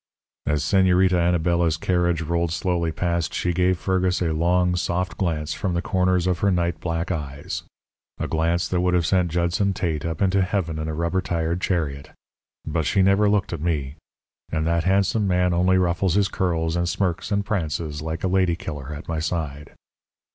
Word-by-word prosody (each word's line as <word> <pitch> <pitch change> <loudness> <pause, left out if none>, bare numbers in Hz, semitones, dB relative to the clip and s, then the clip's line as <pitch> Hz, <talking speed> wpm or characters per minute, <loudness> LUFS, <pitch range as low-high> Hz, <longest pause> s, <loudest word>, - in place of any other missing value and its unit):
"As 75 0 +1
Señorita 95 -1 +3
Anabela's 85 -1 +2
carriage 85 -1 +1
rolled 85 +1 0
slowly 85 -1 0
past, 85 0 -1
she 90 - 0
gave 90 +1 +2
Fergus 95 0 0
a 85 -3 0
long, 90 +2 +2
soft 90 +1 -1
glance 80 -5 -1
from 90 -3 -2
the 85 - 0
corners 90 -1 +1
of 90 -2 0
her 100 - +2
night 85 -2 0
black 85 +1 -2
eyes, 75 -4 -4 0.6
a - - -3
glance 85 +2 0
that 90 -1 0
would 90 0 +2
have 85 -2 +2
sent 90 -1 +2
Judson 85 +4 +1
Tate 80 -6 -2
up 80 -1 -3
into 95 0 +2
heaven 90 -4 -1
in 80 - -3
a 80 - -3
rubber 85 +3 0
tired 85 0 -2
chariot. 75 -8 -2 0.6
But 80 0 -1
she 95 -1 +3
never 100 +2 +4
looked 100 -4 +1
at 80 - -4
me. 75 -5 -1 0.6
And 80 -1 0
that 85 0 +1
handsome 100 +2 +2
man 90 -1 +2
only 90 +2 +3
ruffles 90 0 +1
his 100 -1 +3
curls 80 -3 -1
and 85 0 0
smirks 90 +1 -1
and 100 0 +1
prances 80 -6 -2
like 80 +1 -4
a - - +2
lady 90 -2 +2
killer 75 -3 -6
at 75 - -9
my 80 -1 -2
side. 75 -3 -4
85 Hz, 185 wpm, -23 LUFS, 80-90 Hz, 0.6 s, never